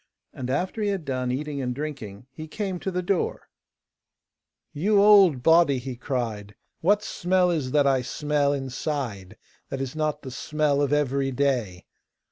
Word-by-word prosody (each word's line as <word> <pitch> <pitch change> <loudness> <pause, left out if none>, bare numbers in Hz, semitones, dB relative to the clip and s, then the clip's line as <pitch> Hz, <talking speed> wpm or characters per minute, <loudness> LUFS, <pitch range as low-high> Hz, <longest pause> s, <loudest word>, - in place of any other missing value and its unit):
And 130 -1 -6
after 185 - -2
he 205 - +1
had 195 -5 -3
done 130 -2 -2
eating 145 +2 -3
and 125 -1 -3
drinking 125 -8 -6
he 155 +2 -9
came 190 +1 -4
to 190 - -3
the 180 -1 -2
door: 180 0 -1 1.3
'You 200 +7 +2
old 195 -10 +6
body!' 160 -3 +5
he 125 0 -5
cried; 115 -5 -4 0.2
'what 205 +5 +2
smell 180 -1 +1
is 150 -6 -1
that 145 +1 +3
I 135 -2 +3
smell 145 +2 0
inside 130 - -4 0.3
that 135 - -4
is 135 +1 -4
not 155 -1 -2
the 130 - -7
smell 150 +2 0
of 145 -1 0
every 140 -2 +1
day? 125 -9 -1
145 Hz, 160 wpm, -25 LUFS, 130-165 Hz, 1.3 s, old